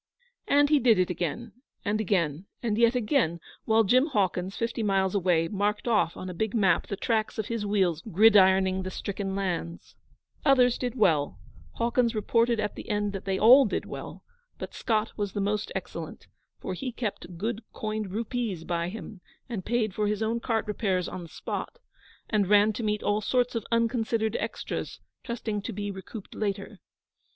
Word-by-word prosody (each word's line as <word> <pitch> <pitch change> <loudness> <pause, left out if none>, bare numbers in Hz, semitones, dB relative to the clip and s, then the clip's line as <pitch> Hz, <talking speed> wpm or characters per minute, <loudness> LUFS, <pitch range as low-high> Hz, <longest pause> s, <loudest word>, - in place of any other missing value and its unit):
And 285 0 +4
he 300 - +6
did 230 -3 +5
it 180 -1 +2
again 180 +7 -3 0.3
and 215 +1 +1
again, 175 -4 0 0.2
and 220 -3 0
yet 235 +2 +4
again, 225 - +1 0.3
while 225 0 +4
Jim 255 +8 +4
Hawkins, 190 - -1
fifty 230 0 -2
miles 195 -3 +1
away, 175 -4 +2
marked 210 +4 -1
off 210 -7 +2
on 185 - -6
a 180 - -5
big 220 +5 -2
map 200 -4 +3
the 200 - -4
tracks 220 +1 0
of 220 - -3
his 225 -3 -2
wheels 185 -6 +1
gridironing 190 -2 +5
the 185 - -4
stricken 195 0 -4
lands. 175 -3 -4 0.5
Others 250 -4 +4
did 245 -1 -2
well 160 - +2 0.4
Hawkins 235 0 +1
reported 230 +2 +2
at 210 -1 -1
the - - -9
end 205 -1 0
that 195 - -6
they 190 -1 0
all 250 +7 +8
did 210 - -2
well - - -8 0.3
but - - -7
Scott 220 -1 -1
was 205 -3 -2
the - - -2
most 205 +1 -1
excellent, - - -6 0.3
for 185 - -4
he 250 +8 -4
kept 210 -7 -5
good 220 +4 -2
coined 215 -2 -3
rupees 220 -3 -3
by 170 0 -2
him, 210 -1 -8 0.3
and 215 -7 -5
paid 225 -4 0
for 210 +1 0
his 210 +1 -1
own 225 +2 0
cart 225 -1 -1
repairs 195 -4 -1
on 185 - -6
the 170 - -10
spot, - - -5 0.5
and 210 -3 +1
ran 210 +1 +5
to 220 - -4
meet 210 -1 -1
all 205 +1 +1
sorts 245 +3 +1
of 230 -3 -2
unconsidered 230 -1 +1
extras, - - -4 0.2
trusting 220 -3 -3
to 230 - -5
be 205 -1 -4
recouped 195 +2 -9
later. 200 0 -3
210 Hz, 180 wpm, -27 LUFS, 190-230 Hz, 0.5 s, all